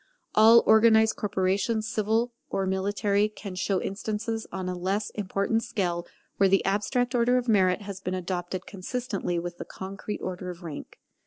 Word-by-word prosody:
All 225 +2 +7
organized 220 0 +5
corporations, 200 +2 0
civil 220 +3 0 0.2
or 195 - -1
military, 200 +2 +1
can 205 -2 -8
show 190 +1 0
instances 215 +3 -3
on 185 -1 -4
a 185 - -2
less 195 +4 -2
important 200 +2 -1
scale 175 -6 -2 0.3
where 195 -1 +4
the 195 0 +3
abstract 220 +5 0
order 245 +1 +3
of 250 0 -1
merit 190 -3 +3
has 195 -1 -7
been 185 0 -2
adopted 180 0 -4
consistently 200 -2 -3
with 175 +1 -5
the - - -5
concrete 195 +2 -6
order 185 0 -4
of 175 0 -8
rank. 155 -4 -8
200 Hz, 160 wpm, -27 LUFS, 185-220 Hz, 0.3 s, All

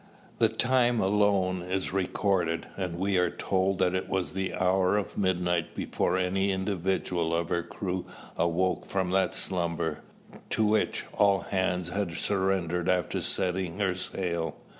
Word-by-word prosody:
The - - +5
time 120 -1 +2
alone 95 -2 +2
is 95 +1 -2
recorded; 90 -3 0
and 90 -3 -3
we 95 0 +1
are 90 -1 +3
told 95 0 0
that 90 -1 +2
it 95 - -2
was 95 -2 -1
the 95 0 -2
hour 95 +1 +2
of 105 - -3
midnight 90 -3 0
before 90 - 0
any 95 +2 +1
individual 95 -3 -1
of 85 0 -1
her 85 - +1
crew 90 +1 -4 0.3
awoke 90 +2 0
from 95 -2 -1
that 95 0 +2
slumber, 85 -3 -1 0.5
to 110 - +1
which 105 0 +1
"all 100 -1 +4
hands" 90 -2 -1
had 100 -2 -2
surrendered 95 -2 0
after 90 -3 +1
setting 90 -1 -1
her 100 -3 +1
sail. 85 -3 -3
95 Hz, 145 wpm, -28 LUFS, 90-95 Hz, 0.5 s, The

